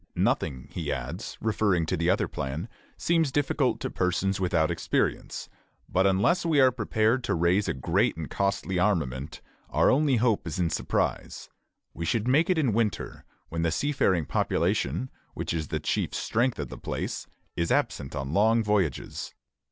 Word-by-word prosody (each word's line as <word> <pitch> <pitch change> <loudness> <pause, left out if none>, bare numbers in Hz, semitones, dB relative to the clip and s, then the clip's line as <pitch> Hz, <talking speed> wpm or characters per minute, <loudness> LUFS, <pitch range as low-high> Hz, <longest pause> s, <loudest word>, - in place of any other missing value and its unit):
Nothing, 65 +1 0
he 80 -5 -3
adds, 70 - -5
referring 105 -6 +1
to - - -1
the 85 +2 0
other 95 - +2
plan, 75 +8 -4 0.3
seems 165 -4 +2
difficult 145 +1 +1
to - - -3
persons 95 +2 0
without 85 -4 +1
experience; - - -1 0.4
but 95 +2 +2
unless 100 - +2
we 160 -4 +2
are 130 -1 +6
prepared 115 +1 +1
to 120 - 0
raise 85 +4 +2
a - - 0
great 65 - +1
and 80 -2 -4
costly 100 -1 -1
armament, 80 -8 -1 0.3
our - - +3
only 140 0 +3
hope 115 -5 +1
is 85 - -3
in 85 -2 +1
surprise. - - -2 0.4
We 85 - -4
should 110 +7 0
make 150 +7 +3
it 185 - +3
in 135 -8 +2
winter, 110 -2 -1 0.2
when 85 0 -3
the 85 - +2
seafaring 95 - +1
population, 65 -1 0 0.2
which - - -3
is 80 -2 -2
the - - -2
chief - - -1
strength 120 +2 0
of 70 -4 -4
the - - -9
place, - - -4 0.3
is 85 0 -1
absent 70 0 0
on 70 +1 -3
long 110 +4 +4
voyages. 100 - -1
95 Hz, 165 wpm, -27 LUFS, 80-115 Hz, 0.4 s, are